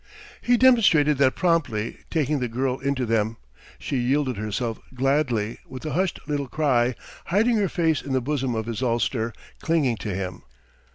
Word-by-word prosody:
He 245 0 +3
demonstrated 195 - +5
that 130 -2 +4
promptly, 145 - 0
taking 150 -2 0
the 125 - -1
girl 130 +2 -1
into 135 -1 -1
them. 110 0 0 0.4
She 140 - -3
yielded 130 +1 +1
herself 110 +2 -3 0.2
gladly, 125 -5 0
with 130 +3 -9
a 155 - -3
hushed 185 0 0
little 145 -2 -2
cry, 125 -4 +1 0.3
hiding 220 +6 +2
her 200 -3 +1
face 160 -3 +1
in 140 - -7
the 130 - +2
bosom 130 -2 -1
of 110 -1 -2
his 115 0 -4
ulster, 120 -1 0 0.3
clinging 145 -8 +1
to 100 -4 -4
him. 95 -1 -4
130 Hz, 165 wpm, -24 LUFS, 115-155 Hz, 0.4 s, demonstrated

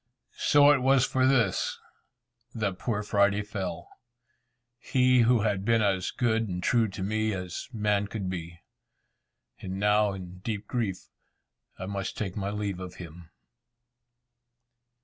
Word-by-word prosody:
So 145 0 +6
it 145 - +4
was 135 0 +4
for 130 0 +2
this 120 -8 +1 0.8
that 100 -4 -2
poor 105 -4 -2
Friday 100 0 +2
fell! 95 -4 -5 0.9
He 125 0 +3
who 120 -1 +4
had 100 -3 0
been 115 +1 +3
as 95 -3 +1
good 115 -2 0
and 90 0 -4
true 115 -2 +3
to 95 -1 -6
me 110 +2 0
as 90 +2 -6
man 105 -3 0
could 100 -2 -4
be! 85 -2 -6 1.0
And 95 +1 -5
now 105 0 +3
in 90 -1 -9
deep 105 +1 -4
grief 110 -7 -3 0.7
I - - -6
must 100 0 -4
take 95 -3 -3
my 100 -1 -2
leave 100 -2 -3
of 90 -1 -8
him. 85 -1 -11
105 Hz, 140 wpm, -28 LUFS, 95-115 Hz, 1.0 s, So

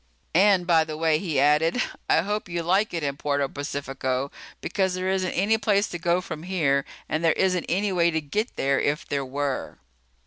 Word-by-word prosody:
"And, 190 0 +4
by 165 -2 +4
the 155 -1 -6
way," 160 -1 +2
he 160 -7 -1
added, 150 - +3 0.3
"I - - +5
hope 205 +1 -3
you 170 -1 -2
like 190 +6 +2
it 170 -3 -3
in 140 -1 -2
Puerto 140 -1 0
Pacifico. 135 -1 -3 0.3
Because 190 -2 -1
there 185 +1 -2
isn't 185 -1 -1
any 215 +4 +2
place 205 -2 +2
to 175 - -5
go 175 +2 +1
from 160 -3 -7
here 155 -6 +1 0.2
and 155 +2 -2
there 165 - +4
isn't 185 -2 +1
any 200 +3 +1
way 170 -2 +3
to 160 -1 0
get 205 - -3
there 135 0 +1
if 145 +1 -1
there 140 -1 -1
were." 140 +1 -3
165 Hz, 200 wpm, -25 LUFS, 145-185 Hz, 0.3 s, I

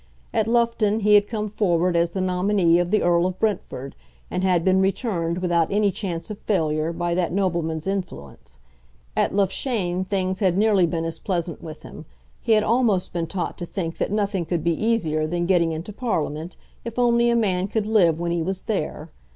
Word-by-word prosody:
At 220 - +1
Loughton 230 -2 +2
he 210 +1 +4
had 205 0 +6
come 215 -2 -3
forward 180 -4 +1
as 170 0 +2
the 190 +2 -3
nominee 185 -1 +2
of 175 0 0
the 215 +2 +2
Earl 175 0 +3
of 185 0 -5
Brentford, 170 -10 -2 0.4
and 180 - -2
had 180 -3 +2
been 190 0 +4
returned 190 -4 -1
without 175 -3 +1
any 205 0 +2
chance 180 0 -5
of 210 - -7
failure 160 -5 0
by 170 0 -2
that 175 0 0
nobleman's 170 -4 -1
influence. 180 - -6 0.6
At - - +1
Loughshane 195 -2 0
things 190 -1 -1
had 185 -3 +2
nearly 205 -4 +4
been 165 -1 -2
as 165 0 -4
pleasant 175 -3 -3
with 155 -1 -9
him. - - -10 0.3
He 230 - +1
had 215 -1 +4
almost 220 -5 +1
been 170 -1 -2
taught 185 +2 -4
to 175 - -4
think 165 -4 -4
that - - -1
nothing 200 -3 0
could 165 -1 -2
be 170 0 +2
easier 160 -7 0
than 175 +1 -1
getting 170 -2 +2
into 165 +6 -5
Parliament 170 - -3 0.3
if 230 0 -7
only 240 -1 +3
a 235 - +3
man 190 -5 +1
could 215 +1 -1
live 180 -7 +3
when 170 0 -1
he 170 -1 0
was 190 +3 -3
there. 160 -6 -3
185 Hz, 195 wpm, -23 LUFS, 170-210 Hz, 0.6 s, had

